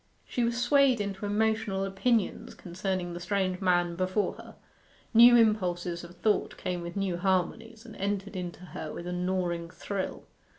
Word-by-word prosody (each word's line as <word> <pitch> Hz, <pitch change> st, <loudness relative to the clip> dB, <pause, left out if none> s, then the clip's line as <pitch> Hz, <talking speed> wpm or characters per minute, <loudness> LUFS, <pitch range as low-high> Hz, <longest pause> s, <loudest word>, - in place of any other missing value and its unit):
She 245 Hz, -, -1 dB
was 235 Hz, +1 st, 0 dB
swayed 260 Hz, -1 st, +4 dB
into 200 Hz, 0 st, -3 dB
emotional 210 Hz, -2 st, 0 dB
opinions 200 Hz, +2 st, 0 dB
concerning 180 Hz, 0 st, -3 dB
the 175 Hz, -, -5 dB
strange 185 Hz, +1 st, -1 dB
man 175 Hz, -2 st, +2 dB
before 185 Hz, +3 st, 0 dB
her; -, -, -12 dB, 0.6 s
new 240 Hz, +1 st, +9 dB
impulses 180 Hz, -6 st, +2 dB
of 175 Hz, 0 st, -11 dB
thought 210 Hz, +2 st, 0 dB
came 180 Hz, -1 st, -3 dB
with 170 Hz, +2 st, -6 dB
new 190 Hz, -3 st, -1 dB
harmonies, 195 Hz, +5 st, -1 dB
and 220 Hz, -3 st, -11 dB
entered 200 Hz, +1 st, -2 dB
into 180 Hz, -1 st, -5 dB
her 155 Hz, -3 st, -7 dB
with 170 Hz, -, -7 dB
a 180 Hz, -, -3 dB
gnawing 180 Hz, -2 st, -1 dB
thrill. 190 Hz, +2 st, -5 dB
190 Hz, 160 wpm, -29 LUFS, 175-215 Hz, 0.6 s, new